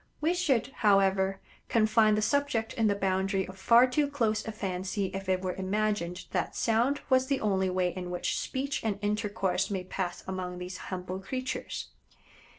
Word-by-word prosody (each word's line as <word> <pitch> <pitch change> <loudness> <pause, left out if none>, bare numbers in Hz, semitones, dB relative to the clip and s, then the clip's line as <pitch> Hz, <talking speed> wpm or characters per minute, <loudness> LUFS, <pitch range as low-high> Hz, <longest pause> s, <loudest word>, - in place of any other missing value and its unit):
We 320 +3 +2
should, 295 -11 +1
however, 195 -2 +3 0.3
confine 215 -1 +4
the 215 - 0
subject 265 -3 0
in 225 -1 +2
the 200 - +2
boundary 190 0 0
of 190 - -9
far 235 +5 +6
too 285 +3 +1
close 225 -6 0
a - - -2
fancy 190 -1 -3
if 195 0 -5
it 185 0 +1
were 185 -1 -1
imagined 190 -2 -1
that - - -1
sound 235 +5 +2
was 260 0 +4
the 275 -1 +1
only 190 -3 +1
way 180 -1 0
in 180 -1 -5
which 180 0 -1
speech 270 +2 -3
and 215 -3 0
intercourse 205 -2 0
may 190 -3 -2
pass 180 -1 -4
among 185 -1 -4
these 180 +1 -6
humble 185 0 -4
creatures. 255 +6 -4
200 Hz, 170 wpm, -29 LUFS, 185-230 Hz, 0.3 s, far